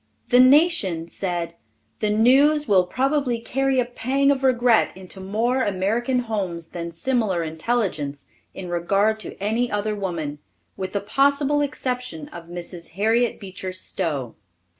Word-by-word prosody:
The 245 Hz, -, +5 dB
Nation 255 Hz, -, +4 dB
said, 175 Hz, -2 st, -3 dB, 0.5 s
"The 215 Hz, -, 0 dB
news 275 Hz, +8 st, +4 dB
will 185 Hz, -3 st, +4 dB
probably 265 Hz, +2 st, 0 dB
carry 270 Hz, +2 st, 0 dB
a 250 Hz, -, +2 dB
pang 265 Hz, +4 st, +1 dB
of 275 Hz, -1 st, 0 dB
regret 245 Hz, -6 st, +3 dB
into 190 Hz, +1 st, -10 dB
more 225 Hz, +7 st, 0 dB
American 225 Hz, +6 st, 0 dB
homes 190 Hz, -8 st, -4 dB
than 170 Hz, -1 st, -5 dB
similar 195 Hz, -1 st, 0 dB
intelligence 160 Hz, -4 st, -2 dB, 0.3 s
in 190 Hz, -, -6 dB
regard 195 Hz, +5 st, +1 dB
to -, -, -8 dB
any 225 Hz, +5 st, 0 dB
other 210 Hz, +1 st, -1 dB
woman, 165 Hz, -7 st, -4 dB, 0.4 s
with 185 Hz, 0 st, -5 dB
the 200 Hz, -, -1 dB
possible 280 Hz, +6 st, +2 dB
exception 250 Hz, -, -3 dB
of 170 Hz, -1 st, -10 dB
Mrs. 175 Hz, -1 st, -8 dB
Harriet 225 Hz, +3 st, +2 dB
Beecher 190 Hz, -2 st, -6 dB
Stowe." 155 Hz, -9 st, -4 dB
210 Hz, 140 wpm, -23 LUFS, 180-250 Hz, 0.5 s, The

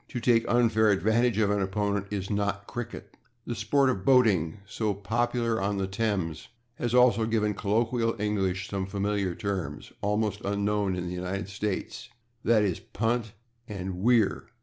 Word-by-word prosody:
To 125 Hz, -, -4 dB
take 115 Hz, -1 st, +3 dB
unfair 115 Hz, -2 st, +4 dB
advantage 110 Hz, +3 st, +2 dB
of 105 Hz, -2 st, +2 dB
an 105 Hz, -1 st, +1 dB
opponent 100 Hz, +1 st, -1 dB
is 100 Hz, 0 st, -3 dB
not 100 Hz, -1 st, -1 dB
/cricket/. 120 Hz, -1 st, -6 dB, 0.4 s
The -, -, -3 dB
sport 130 Hz, +5 st, +2 dB
of 95 Hz, -6 st, -4 dB
boating, 105 Hz, -11 st, +3 dB
so 105 Hz, 0 st, -2 dB
popular 115 Hz, +2 st, 0 dB
on 100 Hz, +1 st, 0 dB
the 95 Hz, -, 0 dB
Thames, 95 Hz, -5 st, -2 dB, 0.3 s
has 120 Hz, 0 st, 0 dB
also 120 Hz, -3 st, +5 dB
given 105 Hz, -2 st, +1 dB
colloquial 115 Hz, +2 st, 0 dB
English 95 Hz, -3 st, -1 dB
some 95 Hz, -2 st, -3 dB
familiar 100 Hz, -2 st, -1 dB
terms, 95 Hz, -8 st, -4 dB
almost 105 Hz, 0 st, 0 dB
unknown 100 Hz, -1 st, 0 dB
in 90 Hz, -1 st, -3 dB
the 90 Hz, -, -4 dB
United 90 Hz, +3 st, -4 dB
States, 100 Hz, +3 st, -4 dB, 0.3 s
/e. 105 Hz, -5 st, +3 dB
g./, -, -, -11 dB
/punt/ 115 Hz, -1 st, 0 dB, 0.3 s
and 95 Hz, -3 st, -5 dB
/weir 115 Hz, -4 st, +3 dB
105 Hz, 155 wpm, -28 LUFS, 95-115 Hz, 0.4 s, also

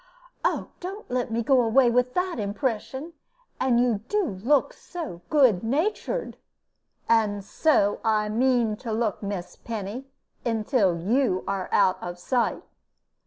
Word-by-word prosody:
Oh, -, -, 0 dB
don't 385 Hz, 0 st, -7 dB
let 250 Hz, -1 st, -1 dB
me 230 Hz, +1 st, 0 dB
go 260 Hz, +2 st, +4 dB
away 240 Hz, +2 st, +4 dB
with 250 Hz, +1 st, +1 dB
that 360 Hz, -7 st, -1 dB
impression. 255 Hz, +8 st, -3 dB, 0.5 s
And 250 Hz, -2 st, +3 dB
you 240 Hz, -4 st, +2 dB
do 415 Hz, -2 st, +1 dB
look 255 Hz, -, +1 dB
so 315 Hz, -, -7 dB
good 255 Hz, -11 st, +4 dB
natured!" 375 Hz, -, -1 dB, 0.7 s
"And 210 Hz, -3 st, +2 dB
so 205 Hz, -7 st, +2 dB
I 215 Hz, -1 st, +2 dB
mean 235 Hz, -1 st, +2 dB
to 230 Hz, -1 st, -6 dB
look, 220 Hz, -2 st, -1 dB
Miss 200 Hz, -3 st, -5 dB
Penny, 225 Hz, +3 st, -6 dB, 0.4 s
until 220 Hz, -5 st, +1 dB
you 205 Hz, +2 st, +1 dB
are 195 Hz, -2 st, -2 dB
out 185 Hz, -, +3 dB
of 175 Hz, 0 st, -6 dB
sight." 240 Hz, +7 st, 0 dB
235 Hz, 135 wpm, -25 LUFS, 205-265 Hz, 0.7 s, go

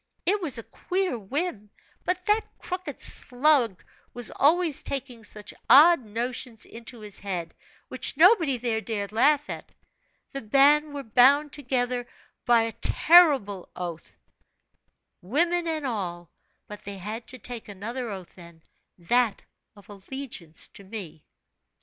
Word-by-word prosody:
It 405 Hz, +2 st, +2 dB
was 300 Hz, -8 st, 0 dB
a 230 Hz, -, -6 dB
queer 370 Hz, -, -2 dB
whim; 220 Hz, -, -4 dB, 0.4 s
but 360 Hz, 0 st, -2 dB
that 425 Hz, +1 st, +2 dB
crooked 360 Hz, -6 st, -5 dB
slug 250 Hz, -, +3 dB, 0.3 s
was 245 Hz, -2 st, -1 dB
always 320 Hz, +1 st, +2 dB
taking 255 Hz, -4 st, -5 dB
such 210 Hz, 0 st, -8 dB, 0.2 s
odd 310 Hz, 0 st, +8 dB
notions 230 Hz, +1 st, -4 dB
into 230 Hz, 0 st, -10 dB
his 210 Hz, -2 st, -7 dB
head, 175 Hz, -4 st, -5 dB, 0.3 s
which -, -, -1 dB
nobody 330 Hz, -, +5 dB
there 230 Hz, -2 st, -1 dB
dared 210 Hz, -3 st, -4 dB
laugh 290 Hz, +6 st, +3 dB
at. -, -, -8 dB, 0.6 s
The 275 Hz, -, -5 dB
band 285 Hz, +6 st, +4 dB
were 280 Hz, -, -5 dB
bound 275 Hz, +6 st, +4 dB
together 250 Hz, -3 st, -1 dB, 0.4 s
by 235 Hz, -1 st, +5 dB
a 225 Hz, -, -3 dB
terrible 280 Hz, -, +4 dB
oath, 170 Hz, -3 st, -7 dB, 1.0 s
women 335 Hz, -, 0 dB
and 315 Hz, -3 st, -2 dB
all; 175 Hz, -, -4 dB, 0.4 s
but 210 Hz, 0 st, -9 dB
they 200 Hz, 0 st, -7 dB
had 215 Hz, +5 st, -6 dB
to 255 Hz, -, -6 dB
take 240 Hz, 0 st, -7 dB
another 230 Hz, +5 st, -5 dB
oath 190 Hz, -4 st, -8 dB
then, 170 Hz, -2 st, -15 dB, 0.3 s
that 230 Hz, +5 st, +1 dB, 0.3 s
of 205 Hz, -, -18 dB
allegiance 200 Hz, -, -7 dB
to 200 Hz, -, -14 dB
me. 190 Hz, -7 st, -8 dB
245 Hz, 135 wpm, -26 LUFS, 205-290 Hz, 1.0 s, odd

